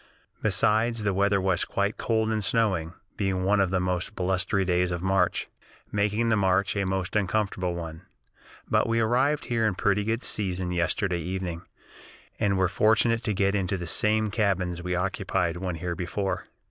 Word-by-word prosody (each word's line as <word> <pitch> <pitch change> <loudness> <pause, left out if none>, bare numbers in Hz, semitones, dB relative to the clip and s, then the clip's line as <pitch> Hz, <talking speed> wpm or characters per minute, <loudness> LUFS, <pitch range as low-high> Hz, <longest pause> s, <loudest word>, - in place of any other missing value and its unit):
Besides, 110 +3 +2
the 100 -1 +1
weather 100 +1 +2
was 95 -1 +1
quite 100 +1 -1
cold 110 -1 0
and 110 -1 -1
snowing, 95 -7 +1 0.2
being 95 -2 0
one 100 +2 +3
of 95 -2 +2
the 95 0 +1
most 90 +2 -2
blustery 95 +1 0
days 90 0 +1
of 90 0 -3
March, 95 -2 +1 0.4
making 105 +3 +1
the 110 - +4
march 100 0 +2
a 100 -1 0
most 95 0 -2
uncomfortable 95 -3 0
one. 80 -1 -6 0.7
But - - +2
we 115 0 +2
arrived 130 +6 +2
here 115 -2 0
in 100 - -1
pretty 100 +2 +1
good 115 +3 -1
season 90 -3 -2
yesterday 90 +1 0
evening, 90 0 -4 0.8
and 100 -3 +1
were 95 0 +3
fortunate 110 +4 +2
to 105 - 0
get 100 0 +2
into 100 -1 0
the 90 - -5
same 105 +4 +2
cabins 95 -5 0
we 90 0 -2
occupied 90 -1 -1
when 90 -1 -3
here 85 +2 -3
before. 95 +2 -3
95 Hz, 170 wpm, -26 LUFS, 90-105 Hz, 0.8 s, the